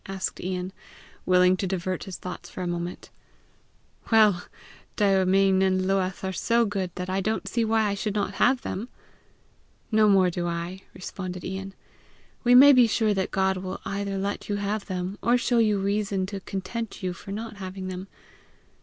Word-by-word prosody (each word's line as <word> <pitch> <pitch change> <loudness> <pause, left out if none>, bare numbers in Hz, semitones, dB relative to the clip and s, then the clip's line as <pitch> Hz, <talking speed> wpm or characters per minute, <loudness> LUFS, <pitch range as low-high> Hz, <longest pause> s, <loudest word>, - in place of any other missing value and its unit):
asked 195 -1 -4
Ian, 185 0 -3 0.5
willing 180 0 +5
to 190 +1 -2
divert 185 -1 -3
his 190 -2 -7
thoughts 180 -1 -8
for 185 - -6
a - - -2
moment. 175 +1 -5 1.0
"Well! 210 -5 +5 0.5
Daoimean 195 -1 +3
and 190 -1 +2
Luath 190 -1 0
are 190 0 -2
so 235 +5 +2
good 195 -3 -2
that 180 0 -4
I 190 +1 -1
don't 220 +3 -2
see 235 - 0
why 220 0 +2
I 205 -1 +1
should 205 +1 -3
not 205 -1 -1
have 250 0 +4
them!" 220 +7 -4 1.0
"No 215 -1 +5
more 190 -2 +4
do 175 0 -2
I!" 170 +2 -4
responded 185 -1 -6
Ian. 195 +1 -5 0.7
"We 245 0 +5
may 280 +3 +10
be 250 -3 +6
sure 220 -1 +2
God 190 0 0
will 185 0 -5
either 200 0 -3
let 200 +2 -3
you 205 - 0
have 205 +1 -2
them, 185 +1 -4
or 240 +2 +3
show 245 -1 +1
you 215 -2 +3
reason 200 -1 0
to 200 +1 -5
content 200 +3 -5
you 180 -1 -1
for 185 +3 -10
not 220 +1 -6
having 190 -1 -6
them. 185 +1 -6
195 Hz, 175 wpm, -26 LUFS, 185-210 Hz, 1.0 s, may